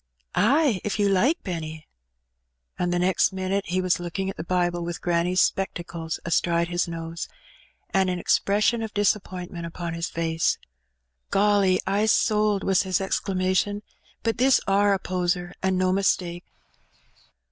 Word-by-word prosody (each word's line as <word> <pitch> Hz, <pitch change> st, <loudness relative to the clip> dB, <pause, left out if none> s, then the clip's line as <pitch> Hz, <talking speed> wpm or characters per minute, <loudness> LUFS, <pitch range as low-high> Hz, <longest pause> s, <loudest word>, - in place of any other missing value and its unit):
Ay, 260 Hz, -, +3 dB
if 210 Hz, -, -2 dB
you 205 Hz, -1 st, +2 dB
like, 240 Hz, -, +3 dB
Benny." 160 Hz, -4 st, -5 dB, 0.9 s
And 175 Hz, 0 st, 0 dB
the 175 Hz, -, +1 dB
next 180 Hz, 0 st, +2 dB
minute 190 Hz, +1 st, -2 dB
he 185 Hz, +2 st, 0 dB
was^ 180 Hz, -1 st, +1 dB
looking 175 Hz, +3 st, -3 dB
at -, -, -12 dB
the 160 Hz, -, -5 dB
Bible 175 Hz, 0 st, 0 dB
with 170 Hz, 0 st, -4 dB
granny's 175 Hz, +1 st, +1 dB
spectacles 170 Hz, -3 st, -2 dB
astride 170 Hz, 0 st, +1 dB
his 175 Hz, 0 st, 0 dB
nose, 165 Hz, 0 st, -5 dB, 0.6 s
and 190 Hz, -1 st, +2 dB
an 180 Hz, -, -1 dB
expression 210 Hz, +6 st, +2 dB
of 220 Hz, -2 st, -5 dB
disappointment 185 Hz, -4 st, -1 dB
upon 170 Hz, 0 st, -5 dB
his 170 Hz, +1 st, -3 dB
face. 165 Hz, -1 st, 0 dB, 0.7 s
"Golly! 200 Hz, -2 st, +3 dB
I's 205 Hz, +3 st, +2 dB
sold!" 210 Hz, -3 st, +2 dB
was 190 Hz, -1 st, +3 dB
his 185 Hz, -2 st, 0 dB
exclamation. 190 Hz, +1 st, 0 dB, 0.4 s
"But 225 Hz, 0 st, -1 dB
this, 260 Hz, +1 st, +5 dB
are 200 Hz, +1 st, +3 dB
a 195 Hz, -, +3 dB
poser, 180 Hz, -1 st, -2 dB
and 190 Hz, -1 st, +1 dB
no 185 Hz, 0 st, +2 dB
mistake." 180 Hz, -2 st, 0 dB
185 Hz, 145 wpm, -25 LUFS, 175-200 Hz, 0.9 s, this